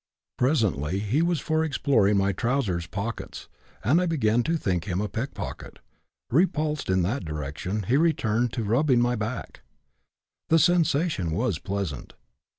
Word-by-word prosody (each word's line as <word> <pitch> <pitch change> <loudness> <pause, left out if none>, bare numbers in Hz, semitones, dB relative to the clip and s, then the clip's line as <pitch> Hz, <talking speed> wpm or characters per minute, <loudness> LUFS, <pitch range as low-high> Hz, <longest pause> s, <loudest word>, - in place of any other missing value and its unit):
Presently 95 - +1
he 105 +9 0
was 170 -2 +1
for 160 0 0
exploring 115 -9 +2
my 100 0 +2
trousers 100 -5 -1
pockets 105 +6 -5 0.4
and 145 - +3
I 180 - 0
began 120 -8 +2
to 165 +7 0
think 90 - -1
him 90 -2 -2
a 105 - -1
pickpocket; 120 +6 -6 0.5
repulsed 155 - +1
in 95 -1 +2
that 115 +11 -1
direction, 75 +6 -4
he 120 +8 +2
returned, 120 -8 +1
to 120 - -2
rubbing 125 +4 +3
my 120 0 +2
back. 115 +2 -5 0.9
The 165 - +5
sensation 165 - +2
was 110 -3 0
pleasant. 95 -9 -4
115 Hz, 145 wpm, -26 LUFS, 95-150 Hz, 0.9 s, The